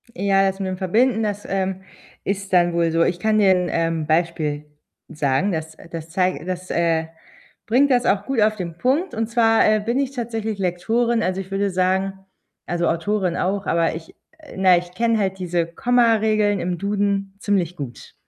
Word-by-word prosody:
Ja, 195 -1 +2
das 190 +1 -7
mit 190 - -2
dem 185 - -4
Verbinden, 220 +5 +2
das, 205 -1 -3
ähm, 190 -1 -2 0.4
ist 195 0 -3
dann 175 -1 +4
wohl 170 -1 +1
so. 165 +1 +3
Ich 175 - 0
kann 215 +2 +1
dir 195 -2 +5
'n, 180 -1 0
ähm, 165 -2 0
Beispiel 155 -2 0 0.4
sagen, 150 +6 0
das, 160 -1 -4
äh - - -15
das 165 -1 -7
zei 185 +1 0
das, 185 0 -5
äh, 165 -1 +1 0.6
bringt 260 +5 +3
das 245 -1 +3
auch 200 0 +1
gut 265 -5 0
auf 215 0 +3
den 170 -4 -6
Punkt, 280 - 0
und 225 0 -1
zwar, 225 -1 +3
äh, 215 0 +3
bin 235 +5 -1
ich 275 -1 -1
tatsächlich 225 -4 -4
Lektorin. 225 +6 0
Also, 185 +1 -1
ich 190 +1 -12
würde 200 0 0
sagen 190 +1 0 0.5
also, 175 0 -1
Autorin 180 +1 0
auch, 195 +2 -1
aber 165 -1 +1
ich 160 0 -10 0.4
na 190 -1 +5
ja, - - +3
ich 175 0 -12
kenne 230 +1 +1
halt 190 -2 -1
diese 175 -2 -1
Komma-Regeln 215 -1 +2
im 175 0 -2
Duden 200 0 -1
ziemlich 180 -5 0
gut. 135 -6 -8
190 Hz, 190 wpm, -21 LUFS, 175-215 Hz, 0.6 s, dir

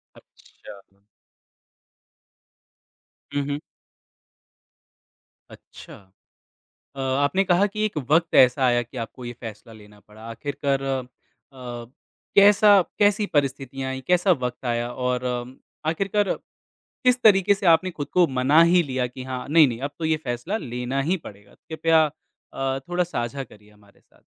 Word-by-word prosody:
अच्छा। 100 - -16 2.6
हुँ, 145 - +1
हुँ। 145 +1 -2 1.9
अच्छा। - - -14 1.0
अ, - - -6
आपने 140 +8 +1
कहा 180 +3 +3
कि 215 +1 -3
एक 210 -7 -3
वक़्त 165 +2 +2
ऐसा 130 +1 +5
आया 120 0 +2
कि 120 +3 -14
आपको 125 +2 -13
ये 120 - -5
फ़ैसला 115 -1 -10
लेना 105 -1 -16
पड़ा। 105 +1 -17
आखिरकार 140 +2 -2
अ, 135 -2 -2 1.3
कैसा 205 +1 +6 0.3
कैसी 205 0 +3
परिस्थितियाँ 135 -2 -2
आईं, 130 - -5
कैसा 180 +1 +3
वक़्त 125 -3 -4
आया, 120 0 -1
और 125 0 -2
अम, 125 +1 -4 0.3
आखिरकर 195 +5 0 0.7
किस 250 0 +3
तरीके 200 -2 +5
से 200 -1 -6
आपने 185 +3 -4
खुद 145 - -3
को 175 - +7
मना 145 +6 +5
ही 180 -1 +5
लिया 130 -3 -2
कि 130 +1 -10
हाँ, 130 -1 -6
नहीं, 155 -2 +6
नहीं, 120 -1 -5
अब 140 +2 -4
तो 160 - -2
ये 160 0 +1
फ़ैसला 145 - -4
लेना 125 - -3
ही 190 - +2
पड़ेगा? 100 0 -15
कृपया 160 0 +1 0.5
अ, 135 0 -2
थोड़ा 180 0 +1
साझा 135 -4 -4
करिए 105 -3 -18
हमारे 105 -1 -24
साथ। - - -30
135 Hz, 140 wpm, -23 LUFS, 125-175 Hz, 2.6 s, को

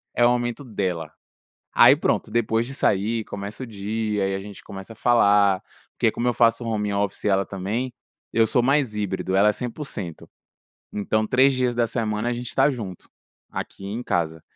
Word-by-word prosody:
é 120 - +3
o - - +6
momento 120 +2 -1
dela. 90 - -3 0.6
Aí - - +8
pronto, - - 0
depois 115 0 +1
disso 135 +2 -3
aí 110 +3 +1
começa 100 +5 -6
o - - -7
dia 105 -1 -2
e 95 - -1
a - - -3
gente 100 0 -10
começa 95 +2 -9
a - - -18
falar. 100 -5 +4 0.3
Porque, - - +3
como 120 - -2
eu 120 - +2
faço 115 0 +3
home 105 -2 -1
office 100 -1 -2
e - - +3
ela 95 0 +2
também, 105 +7 -3 0.4
eu 115 -1 +4
sou 120 +3 +2
mais 135 -4 +2
híbrido, 95 -2 -2
ela 100 +2 +5
é - - +4
100%, 115 - -6 0.6
então 110 +1 0
3 130 +4 +5
dias 125 -2 0
da 120 0 +2
semana 110 -1 -1
a - - 0
gente 120 0 -5
tá 135 +2 +4
junto, 105 -9 -7 0.4
aqui 95 - -6
em 105 +4 -4
casa. 80 -6 -1
110 Hz, 190 wpm, -24 LUFS, 100-120 Hz, 0.6 s, Aí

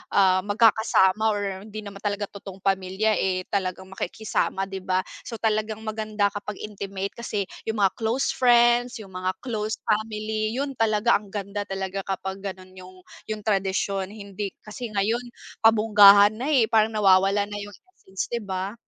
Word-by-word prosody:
ah, 190 -2 +5
magkakasama 215 -2 +3
or 205 - -2 0.3
hindi 215 0 -7
naman 200 -1 -9
talaga 205 0 -2
totoong 195 -1 -10
pamilya, 195 +2 +1
eh, 185 -1 0
talagang 190 -1 -2
makikisama, 195 0 -2
di 195 0 -5
ba? 185 0 0 0.2
So 230 - -5
talagang 215 0 -1
maganda 215 -2 -1
kapag 205 +1 -6
intimate 200 -2 -5
kasi 220 -3 -3 0.2
yung 220 -2 0
mga 195 - +4
close 235 +7 0
friends, 245 -3 +4
yung 195 - -14
mga 185 0 -2
close 220 -3 -2
family, 215 0 -1
yun 275 0 -3
talaga, 225 +1 +2
ang 210 - -15
ganda 200 0 -5
talaga 195 0 -4
kapag 190 0 -4
ganun 190 -1 -7
yung 185 0 -13 0.3
yung 215 -1 -5
tradisyon 195 -1 0
hindi 200 0 -6 0.2
kasi 230 +3 -6
ngayon 225 +5 +1 0.4
pabonggahan 210 -2 +7
na, 260 +4 -3
eh, 250 -5 +5
parang 220 0 +3
nawawala 195 -1 +4
na 205 - -5
yung 205 0 -8 0.2
essence, 190 - -6
di 235 - 0
ba? 190 0 -4
205 Hz, 160 wpm, -25 LUFS, 195-220 Hz, 0.4 s, pabonggahan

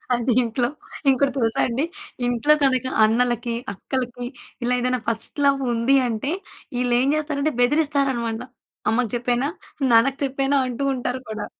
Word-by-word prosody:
అది 240 0 +1
ఇంట్లో 240 +1 0 0.4
ఇంకోటి 270 +1 +3
తెలుసా 225 -3 +1
అండి. 255 +6 0 0.4
ఇంట్లో 245 +5 +3
కనుక 260 -2 +2 0.2
అన్నలకి, 240 +1 +1 0.2
అక్కలకి 245 +3 -4 0.4
ఇలా 245 +1 +1
ఏదైనా 250 0 +1
ఫస్ట్ 225 +5 -3
లవ్ 275 -1 +3
ఉంది 235 +4 +3
అంటే, 235 +6 -2 0.5
ఈళ్ళు 245 -1 +1
ఏం 265 - +1
చేస్తారంటే 305 -1 -1
బెదిరిస్తారు 285 0 +2
అన్నమాట. 230 -1 -3 0.5
"అమ్మకి 235 -1 +1
చెప్పేయనా? 245 +3 0 0.4
నాన్నకి 260 +4 +4
చెప్పేయనా?" 275 +1 +1
అంటూ 245 +3 -3
ఉంటారు 250 +1 -3
కూడా. 215 -1 -4
250 Hz, 140 wpm, -23 LUFS, 235-275 Hz, 0.5 s, నాన్నకి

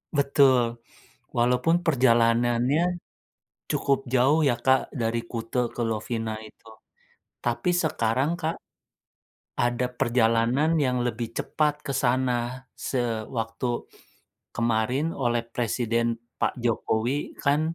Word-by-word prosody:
Betul. 130 -4 +3 0.5
Walaupun 125 +8 +2
perjalanannya 120 +4 +3 0.7
cukup 140 -1 +2
jauh, 135 +5 +4
ya, 120 -4 +3
Kak, 130 +2 +2
dari 115 -2 -1
Kute 115 +1 -2
ke - - -7
Lovina 110 0 -3
itu. 110 +1 -16 0.8
Tapi, 180 - 0
sekarang 130 +1 +1
Kak, 160 -1 -2 1.0
ada 120 +1 +1
perjalanan 120 +6 +2
yang 125 -3 +1
lebih 115 -1 -3
cepat 150 -1 +1
ke - - -2
sana. 125 0 0
Sewaktu 115 -1 -2 0.9
kemarin 120 +7 0
oleh 120 -3 0
Presiden 115 0 -1 0.2
Pak - - 0
Jokowi 120 +3 -1
kan 145 +1 +2
120 Hz, 100 wpm, -26 LUFS, 115-135 Hz, 1.0 s, jauh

